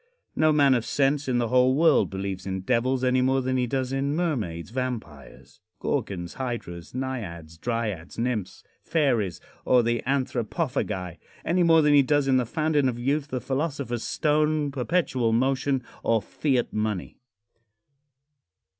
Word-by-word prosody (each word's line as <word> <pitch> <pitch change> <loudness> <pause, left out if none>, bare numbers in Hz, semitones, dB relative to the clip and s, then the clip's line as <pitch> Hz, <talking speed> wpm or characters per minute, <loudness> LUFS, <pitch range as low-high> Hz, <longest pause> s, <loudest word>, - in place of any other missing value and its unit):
No 155 0 +4
man 140 -3 +5
of 120 -3 +1
sense 140 +2 +1
in 125 -2 +1
the 120 -2 0
whole 125 +1 +4
world 160 0 +4
believes 95 0 -5
in 95 0 -3
devils 125 +4 +1
any 130 0 +3
more 130 +1 +2
than 130 0 -1
he 125 -1 +1
does 130 0 -2
in 140 +2 0
mermaids, 110 - -2
vampires, 120 - -6 0.2
gorgons, 85 -3 -2
hydras, 120 -9 -6
naiads, 100 -12 -5
dryads, 110 -8 -3
nymphs, 115 -5 -2 0.2
fairies 125 - 0 0.2
or 125 -1 +4
the 120 0 0
anthropophagi 125 - -2 0.3
any 180 +2 +2
more 165 -2 +5
than 150 0 +4
he 145 - +7
does 145 +1 +1
in 130 -1 +4
the 125 -3 0
Fountain 155 -2 +1
of 120 - -4
Youth, 140 +4 0
the 130 -3 -3
Philosopher's 135 -3 -2
Stone, 150 -1 +1
Perpetual 130 -4 0
Motion 135 +2 +1 0.2
or 115 -1 +2
Fiat 130 +2 -1
Money. 105 -3 -3
130 Hz, 145 wpm, -26 LUFS, 115-140 Hz, 0.3 s, he